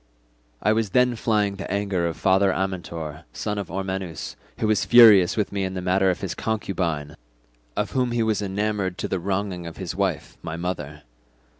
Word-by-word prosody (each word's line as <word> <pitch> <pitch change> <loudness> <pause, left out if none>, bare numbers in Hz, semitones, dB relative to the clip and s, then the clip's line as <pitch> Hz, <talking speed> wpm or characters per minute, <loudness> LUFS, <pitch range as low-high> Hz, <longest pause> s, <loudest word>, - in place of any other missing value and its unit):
I 105 - +4
was 110 -2 0
then 125 -1 +4
flying 105 -3 0
the 100 - -6
anger 100 -3 0
of 85 - -4
father 95 +1 +3
Amyntor, 85 -5 -4
son 105 -1 -3
of 100 - -5
Ormenus, 95 -2 -4 0.2
who - - -1
was 110 -1 +2
furious 110 -7 +7
with 105 - 0
me 100 -1 -1
in 95 0 -3
the - - -2
matter 95 +1 +3
of 90 - -1
his 95 - -3
concubine, 85 -9 -2 0.6
of - - -1
whom 125 -1 +1
he 120 -1 +1
was 110 -2 +1
enamoured 100 -1 -1
to 105 - -2
the 95 - -1
wronging 95 -1 -2
of 85 - -9
his 95 -1 -4
wife 95 -5 -2
my 80 -1 -5
mother. 75 -4 -4
95 Hz, 185 wpm, -24 LUFS, 90-105 Hz, 0.6 s, furious